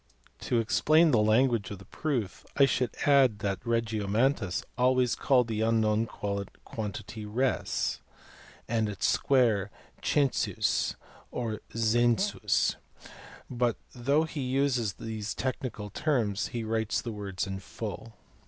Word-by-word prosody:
To 120 Hz, -, 0 dB
explain 155 Hz, +8 st, +4 dB
the 115 Hz, -5 st, +4 dB
language 110 Hz, -1 st, +3 dB
of 100 Hz, -, -6 dB
the 95 Hz, -, -14 dB
proof 130 Hz, -11 st, -3 dB
I 140 Hz, -, +7 dB
should 125 Hz, -3 st, +1 dB, 0.2 s
add 135 Hz, -6 st, +5 dB
that 95 Hz, -2 st, -2 dB
Regiomontanus 115 Hz, -1 st, 0 dB
always 125 Hz, -1 st, +3 dB
calls 125 Hz, -3 st, +3 dB
the 110 Hz, -1 st, -2 dB
unknown 110 Hz, 0 st, +2 dB
quantity 105 Hz, +1 st, -5 dB
res, 125 Hz, +5 st, 0 dB, 0.7 s
and 110 Hz, -2 st, 0 dB
its 100 Hz, -, -3 dB
square 115 Hz, -7 st, +3 dB, 0.3 s
census 140 Hz, -3 st, +1 dB, 0.3 s
or 115 Hz, -3 st, -3 dB, 0.2 s
zensus, 115 Hz, -, +2 dB, 0.7 s
but 120 Hz, -2 st, 0 dB, 0.2 s
though 140 Hz, +5 st, +2 dB
he 160 Hz, -2 st, -4 dB
uses 130 Hz, -5 st, +1 dB
these 110 Hz, 0 st, -5 dB
technical 125 Hz, -5 st, -4 dB
terms 115 Hz, -10 st, 0 dB
he 120 Hz, -1 st, -4 dB
writes 110 Hz, 0 st, 0 dB
the 115 Hz, -, -5 dB
words 100 Hz, -3 st, -4 dB
in 95 Hz, -1 st, -5 dB
full. 110 Hz, +2 st, -7 dB
115 Hz, 120 wpm, -29 LUFS, 105-130 Hz, 0.7 s, I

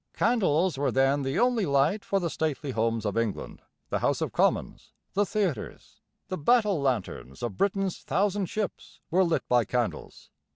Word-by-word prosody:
Candles 185 Hz, -, +2 dB
were 140 Hz, -2 st, +1 dB
then 135 Hz, +3 st, +2 dB
the 135 Hz, +4 st, -2 dB
only 240 Hz, -4 st, +2 dB
light 140 Hz, +9 st, +2 dB
for 195 Hz, -, 0 dB
the 170 Hz, -3 st, -2 dB
stately 150 Hz, -3 st, -2 dB
homes 115 Hz, -1 st, 0 dB
of 105 Hz, -, -1 dB
England, 115 Hz, -3 st, -3 dB, 0.3 s
the -, -, 0 dB
House -, -, +1 dB
of -, -, -2 dB
Commons, -, -, 0 dB, 0.2 s
the 205 Hz, +1 st, +1 dB
theatres. 190 Hz, -, -3 dB, 0.3 s
The 185 Hz, -, -4 dB
battle 210 Hz, -1 st, +3 dB
lanterns 110 Hz, -, -3 dB
of 115 Hz, -5 st, -3 dB
Britain's 195 Hz, -2 st, 0 dB
thousand 200 Hz, -1 st, 0 dB
ships 210 Hz, +2 st, -5 dB
were 185 Hz, +3 st, +4 dB
lit 170 Hz, -2 st, 0 dB
by 125 Hz, -1 st, +4 dB
candles. 120 Hz, +2 st, -3 dB
155 Hz, 165 wpm, -27 LUFS, 125-195 Hz, 0.3 s, were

